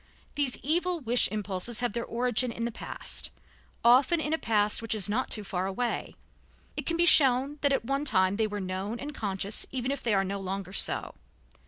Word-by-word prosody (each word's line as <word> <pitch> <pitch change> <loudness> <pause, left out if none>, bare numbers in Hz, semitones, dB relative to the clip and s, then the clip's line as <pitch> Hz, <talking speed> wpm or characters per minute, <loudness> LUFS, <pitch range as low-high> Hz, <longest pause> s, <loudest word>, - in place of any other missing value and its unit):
These 280 -3 -1
evil 345 +4 +1
wish 245 -3 +3
impulses 210 +2 -1
have 245 -4 -1
their 235 0 -2
origin 245 +1 0
in 230 0 -4
the 235 - -2
past, - - -3 0.6
often 260 +8 +5
in 310 0 -1
a - - +2
past 210 -1 +2
which 225 -1 -1
is 205 -3 +2
not 225 +5 -1
too 210 - -3
far 190 -1 -3
away. 235 +5 -3 0.6
It - - -5
can 335 - 0
be 345 - +3
shown 275 -2 +5
that 285 - +3
at 270 - 0
one 275 +3 -1
time 190 -6 +2
they 220 -1 +1
were 205 -1 -5
known 190 +4 -4
and 295 +2 -6
conscious, 200 -3 -2
even 255 0 -2
if 280 - -3
they 205 -5 +1
no 195 +1 -4
longer 190 -1 -5
are - - -11
so. - - 0
230 Hz, 205 wpm, -28 LUFS, 200-270 Hz, 0.6 s, often